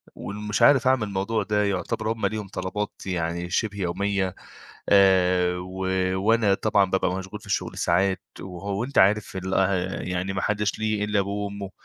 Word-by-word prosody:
ومش 105 +1 -4
عارف 135 -3 +6
أعمل 130 -4 +3
الموضوع 100 +3 -1
ده، 105 0 +1
يعتبر 100 +3 -1
هُم 115 -1 -2
ليهم 110 -2 -2
طلبات 100 +2 -4
يعني 85 -1 -2
شبه 100 +2 -1
يومية 95 +1 -1 0.5
آآ، 90 -2 +4
و 95 +1 -5 0.3
وأنا 105 0 +3
طبعًا 100 -1 +2
بابقى 95 -1 +1
مشغول 95 0 -7
في - - -16
الشغل - - -2
ساعات 95 +2 +1 0.2
وهو 100 +4 -4
أنت 140 - -2
عارف 100 0 +3
ال 95 0 -3
آآ 95 -1 0
يعني 90 +1 -2
ما 95 0 -3
حدش 105 0 0
ليه 110 -1 0
إلا 105 -1 +1
أبوه 100 +1 -2
وأمه، 100 -1 -6
100 Hz, 165 wpm, -25 LUFS, 95-105 Hz, 0.5 s, عارف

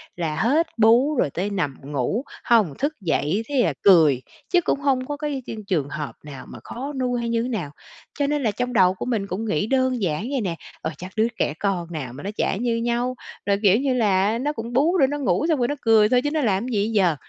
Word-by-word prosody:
là 165 -3 -2
hết 295 - +2
bú 235 +7 +4
rồi 240 - +1
tới 180 +8 -3
nằm 180 -9 -2
ngủ, 145 - -2 0.2
hông 215 -11 +3
thức 285 +3 0
dậy 170 +3 0
thế 275 -4 +2
là - - +1
cười, 155 -9 +6 0.3
chứ 355 -1 +4
cũng 290 - 0
hông 265 -3 +1
có 290 +1 -4
cái 290 -3 -3
cái - - -5
trường 155 -8 0
hợp 150 -1 -5
nào 145 -3 -9
mà - - -10
khó 275 +5 -6
nuôi 250 -1 0
hay 235 - -2
như 230 0 0
thế 250 - -3
nào. 180 - -3 0.5
Cho 285 - +2
nên 295 -1 0
là 220 - +2
trong 250 +4 -3
đầu 185 -5 +5
của 185 - -6
mình 225 -5 -1
cũng 195 +4 -4
nghĩ 205 -2 0
đơn 260 -1 +1
giản 180 +3 -1
vậy 270 -3 0
nè: 180 -5 -2 0.3
"Ờ, - - -2
chắc 180 +3 -8
đứa 220 +1 +3
trẻ - - +1
con 180 -4 -1
nào 135 -7 -5
mà 140 - -9
nó 195 - -3
chả - - 0
như 235 +1 0
nhau. 240 +2 -1 0.3
Rồi, 200 0 +1
kiểu 200 0 +5
như 275 -1 +1
là, 210 -2 +2
nó 290 +5 -1
cũng 230 -2 -6
bú 315 +9 +3
để 270 - +5
nó 290 +2 -3
ngủ, 280 +2 +1
xong 310 -4 +2
rồi 240 - +2
nó 290 - -2
cười 220 -2 +5
thôi, 250 +1 +3
chứ 290 - -1
nó 310 0 0
làm 210 -3 +1
cái 255 - -4
gì 205 0 +1
giờ?" 190 -7 +2
225 Hz, 255 wpm, -23 LUFS, 185-255 Hz, 0.5 s, cười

